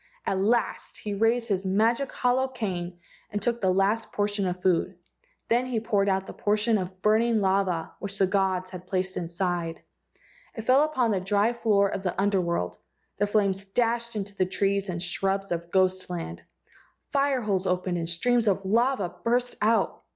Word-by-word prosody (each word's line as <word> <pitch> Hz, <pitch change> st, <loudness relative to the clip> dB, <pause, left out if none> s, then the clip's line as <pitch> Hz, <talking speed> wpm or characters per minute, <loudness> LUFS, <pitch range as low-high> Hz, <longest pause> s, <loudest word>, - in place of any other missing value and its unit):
At 190 Hz, -, 0 dB
last 230 Hz, +4 st, 0 dB
he 210 Hz, -, -5 dB
raised 230 Hz, +3 st, +1 dB
his 195 Hz, -2 st, 0 dB
magic 225 Hz, +7 st, +1 dB
hollow 255 Hz, +1 st, +1 dB
cane 185 Hz, -9 st, -4 dB, 0.3 s
and 205 Hz, -, -2 dB
took 235 Hz, +3 st, -1 dB
the 190 Hz, -2 st, +3 dB
last 200 Hz, +4 st, +1 dB
portion 205 Hz, -1 st, 0 dB
of 180 Hz, 0 st, -3 dB
food. 180 Hz, 0 st, +1 dB, 0.5 s
Then 245 Hz, +2 st, +2 dB
he 245 Hz, -3 st, -1 dB
poured 205 Hz, -3 st, +1 dB
out 190 Hz, 0 st, 0 dB
the -, -, -8 dB
portion 210 Hz, +1 st, +1 dB
of 185 Hz, 0 st, -7 dB
burning 225 Hz, +1 st, +3 dB
lava 190 Hz, -4 st, 0 dB
which 200 Hz, -1 st, -5 dB
the 195 Hz, -, +4 dB
gods 185 Hz, -1 st, 0 dB
had 180 Hz, -1 st, -9 dB
placed 185 Hz, 0 st, -1 dB
inside. 170 Hz, -1 st, -3 dB, 0.7 s
It 225 Hz, -, -5 dB
fell 255 Hz, +4 st, +5 dB
upon 260 Hz, -7 st, +1 dB
the 195 Hz, -, +1 dB
dry 205 Hz, +4 st, +1 dB
floor 210 Hz, -4 st, +2 dB
of 195 Hz, -, -4 dB
the 185 Hz, -1 st, -3 dB
Under 200 Hz, -1 st, +2 dB
world. 170 Hz, -, -2 dB, 0.4 s
The 205 Hz, -, +2 dB
flames 200 Hz, -2 st, +1 dB
dashed 235 Hz, +3 st, 0 dB
into 200 Hz, -1 st, -4 dB
the 185 Hz, -2 st, +1 dB
trees 195 Hz, +1 st, 0 dB
and 170 Hz, -1 st, -3 dB
the 175 Hz, -, -2 dB
shrubs 195 Hz, +2 st, -1 dB
of 170 Hz, 0 st, -3 dB
ghost 185 Hz, 0 st, +2 dB
land. 175 Hz, -2 st, -5 dB, 0.7 s
Fire 275 Hz, -2 st, +2 dB
holes 195 Hz, -3 st, 0 dB
opened 180 Hz, -1 st, 0 dB
and 165 Hz, 0 st, -2 dB
streams 235 Hz, +7 st, +2 dB
of 195 Hz, -1 st, +1 dB
lava 230 Hz, -2 st, +1 dB
burst 245 Hz, +1 st, +1 dB
out. 220 Hz, +2 st, +2 dB
200 Hz, 180 wpm, -26 LUFS, 185-225 Hz, 0.7 s, fell